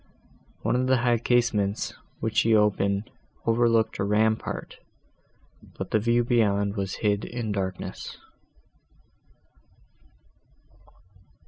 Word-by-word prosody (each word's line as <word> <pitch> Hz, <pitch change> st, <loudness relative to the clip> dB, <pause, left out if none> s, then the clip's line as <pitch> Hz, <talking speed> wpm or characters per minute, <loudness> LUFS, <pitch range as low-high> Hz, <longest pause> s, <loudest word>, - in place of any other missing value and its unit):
One -, -, +1 dB
of 130 Hz, +1 st, +1 dB
the 130 Hz, 0 st, +4 dB
high 120 Hz, -1 st, +3 dB
casements, 110 Hz, -4 st, +1 dB, 0.3 s
which -, -, -2 dB
she 115 Hz, 0 st, +4 dB
opened, 100 Hz, 0 st, +1 dB, 0.3 s
overlooked 115 Hz, -1 st, +2 dB
a -, -, +1 dB
rampart, 110 Hz, +2 st, 0 dB, 1.0 s
but -, -, -5 dB
the 110 Hz, -, +3 dB
view 120 Hz, +2 st, +2 dB
beyond 100 Hz, -4 st, +1 dB
was 95 Hz, -2 st, -3 dB
hid 105 Hz, 0 st, +2 dB
in 120 Hz, -3 st, -4 dB
darkness. 95 Hz, -2 st, -4 dB
110 Hz, 100 wpm, -26 LUFS, 100-120 Hz, 1.0 s, the